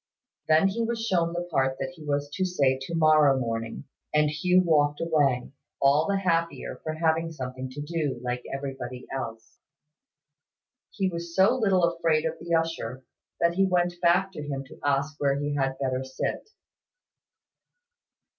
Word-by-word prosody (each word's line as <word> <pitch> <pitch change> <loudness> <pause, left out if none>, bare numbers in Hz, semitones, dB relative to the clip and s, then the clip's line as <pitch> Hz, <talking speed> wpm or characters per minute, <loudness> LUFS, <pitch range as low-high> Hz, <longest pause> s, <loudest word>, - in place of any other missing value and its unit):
Then 160 +4 +5
he 225 +4 -2
was 230 0 -2
shown 170 -6 +1
the 175 +1 -2
part 135 -2 +1
that 135 +2 -4
he 165 -3 -13
was 145 -1 -1
to 190 - -1
say 145 -8 +2
to 150 +5 -4
morrow 155 -4 +5
morning; 115 -1 -3 0.3
and 150 0 +3
Hugh 180 +4 +3
walked 145 -3 +2
away, 145 -7 +1 0.3
all 140 +3 +4
the 200 0 +1
happier 170 -3 -1
for 155 - -3
having 165 +1 +1
something 130 -3 -6
to 140 +3 -7
do, 150 -5 -2
like 125 0 -2
everybody 135 -2 -5
else. 115 -4 -6 1.3
He 195 -3 -1
was 170 -1 -5
so 195 +6 +5
little 195 -7 +2
afraid 165 -2 +2
of 160 - 0
the 170 - -8
usher, 150 -7 -2 0.4
that 170 0 +3
he 195 +2 +3
went 175 -1 +1
back 180 +2 +3
to 165 - -7
him 140 -2 -4
to - - -13
ask 145 +1 0
where 140 -1 +2
he 145 0 -2
had 135 -2 -1
better 130 -1 -1
sit. 130 - -4
155 Hz, 165 wpm, -27 LUFS, 135-170 Hz, 1.3 s, Then